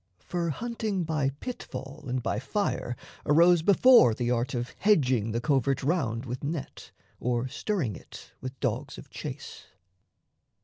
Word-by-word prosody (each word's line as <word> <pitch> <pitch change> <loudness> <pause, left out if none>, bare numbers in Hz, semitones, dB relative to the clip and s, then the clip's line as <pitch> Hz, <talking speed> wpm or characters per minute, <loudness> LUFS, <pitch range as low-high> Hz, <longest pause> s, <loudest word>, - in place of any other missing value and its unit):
(For 175 -1 -1
hunting 215 - -2
by 155 -4 0
pit 195 - -6
fall 135 +3 -8
and 125 -1 -2
by - - -1
fire 130 -3 -2 0.3
arose 170 +3 +5
Before 200 - +6
the 120 0 -1
art 125 +2 0
of 120 0 -3
hedging 130 - +3
the 115 - 0
covert 135 +1 +1
round 130 -6 0
With 125 +2 -5
net 150 0 -5 0.3
or 120 +1 0
stirring 140 - -2
it - - -12
with 130 +1 -7
dogs 130 +2 -2
of 140 - -12
chase.) 140 -1 -7
135 Hz, 145 wpm, -28 LUFS, 125-170 Hz, 0.3 s, Before